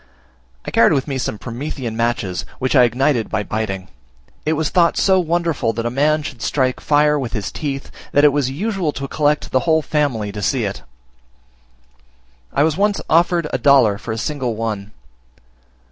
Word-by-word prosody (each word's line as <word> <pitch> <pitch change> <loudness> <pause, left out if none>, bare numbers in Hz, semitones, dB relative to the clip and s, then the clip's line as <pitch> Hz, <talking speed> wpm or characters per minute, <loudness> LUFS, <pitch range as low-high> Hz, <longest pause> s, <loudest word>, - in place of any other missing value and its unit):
I - - -5
carried 115 - +5
with 135 -1 0
me 135 -2 -2
some 110 - -3
promethean 120 0 -5
matches, 115 -6 -1
which 130 +2 -1
I 125 -2 +7
ignited 125 0 +1
by 105 - -1
biting; 100 -4 -3 0.6
it 155 - +3
was 160 0 0
thought 170 -2 +3
so 190 -1 +4
wonderful 165 -8 0
that 115 +1 -3
a 120 - -1
man 150 +4 +2
should 130 -5 -7
strike 130 -3 0
fire 150 0 +3
with 125 -4 -4
his 100 -6 -3
teeth, 140 -2 -5 0.2
that 145 - +3
it 145 -2 +6
was 140 -3 +1
usual 180 +1 -2
to 140 0 -5
collect 150 +1 0
the 130 - +3
whole 160 -1 +2
family 130 -10 -1
to 105 0 -6
see 125 +4 0
it: 100 -1 -4 1.7
I 140 - +2
was 160 0 +1
once 205 0 +1
offered 170 0 +3
a - - 0
dollar 125 -8 +4
for 115 - -6
a 110 - -3
single 125 -2 -2
one. 105 -2 -4
135 Hz, 180 wpm, -19 LUFS, 115-150 Hz, 1.7 s, I